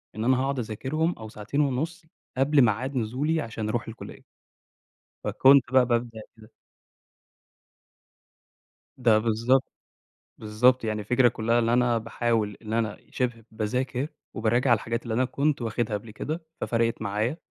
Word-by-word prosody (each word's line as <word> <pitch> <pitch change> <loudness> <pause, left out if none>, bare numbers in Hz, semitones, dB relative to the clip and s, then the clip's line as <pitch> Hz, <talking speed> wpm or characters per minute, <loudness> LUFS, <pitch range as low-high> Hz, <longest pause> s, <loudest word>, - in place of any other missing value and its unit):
إن 110 - -3
أنا 130 +1 +3
هاقعد 135 0 -1
أذاكرهم 130 +9 -1
أو 110 -1 -8
ساعتين 110 +7 -2
ونص 155 +5 -2 0.3
قبل 140 +2 +4
ميعاد 125 +4 +1
نزولي 135 +8 0
عشان 110 -3 -4
أروح 115 +2 -2
الكُليّة. 115 - -10 1.0
فكنت 135 -1 +5
بقى 130 -1 +5
بابدأ 120 -2 -1 0.2
كده. 110 +1 -17 2.5
ده 115 -4 +4
بالضبط، 115 +4 +2 0.8
بالضبط، 115 +4 +2
يعني 110 -1 -1
الفكرة 125 +4 +3
كلَّها 115 +1 0
اللي 115 0 +2
أنا 120 -1 +3
باحاول 115 -2 -1
اللي 110 +1 -2
أنا 110 -2 -2
شِبه 120 -3 -2
باذاكر 125 +5 -2 0.3
وباراجع 120 +4 +1
على 120 - +6
الحاجات 115 +2 -3
اللي 115 -2 -4
أنا 130 +3 +2
كنت 140 +1 0
واخدها 115 -1 -1
قَبل 110 +2 -9
كده، 155 +10 -5 0.2
ففرَقِت 115 -1 0
معايا، 105 +7 -1
120 Hz, 140 wpm, -26 LUFS, 110-130 Hz, 2.5 s, على